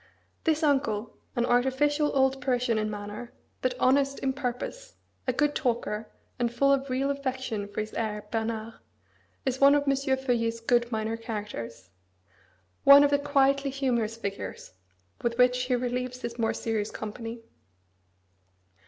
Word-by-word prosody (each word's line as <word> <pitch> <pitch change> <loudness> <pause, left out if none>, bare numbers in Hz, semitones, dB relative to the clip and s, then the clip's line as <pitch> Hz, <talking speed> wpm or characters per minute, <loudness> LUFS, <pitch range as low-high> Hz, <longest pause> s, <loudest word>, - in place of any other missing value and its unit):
This 320 -1 +2
uncle, 240 -7 +1 0.2
an 240 - +2
artificial 265 +5 +2
old 265 0 +2
Parisian 245 -3 +1
in 215 0 -1
manner, 210 +3 -7 0.3
but 255 -1 0
honest 275 +1 +3
in 265 -1 -1
purpose, 280 - -5 0.3
a - - +4
good 295 +3 +1
talker, 230 -6 -1 0.3
and 240 -1 +1
full 275 +4 +3
of 275 0 -1
real 270 +2 +1
affection 260 -6 -3
for 205 +1 -3
his 215 - -6
heir 210 -2 -3
Bernard, 225 0 -2 0.7
is 260 0 -1
one 280 +1 +8
of 290 - +2
M. 275 -1 +2
Feuillet's 260 -4 0
good 240 +1 +1
minor 220 0 -1
characters 205 - -6 0.9
one 280 +1 +9
of 285 - +3
the 285 - +3
quietly 275 -1 +2
humorous 240 -5 -1
figures 200 -3 -5 0.5
with 235 -1 -1
which 250 0 +4
he 250 0 +1
relieves 250 +1 -2
his 235 0 -5
more 225 -1 +1
serious 220 -2 -1
company. 225 +2 -6
245 Hz, 145 wpm, -28 LUFS, 225-275 Hz, 0.9 s, one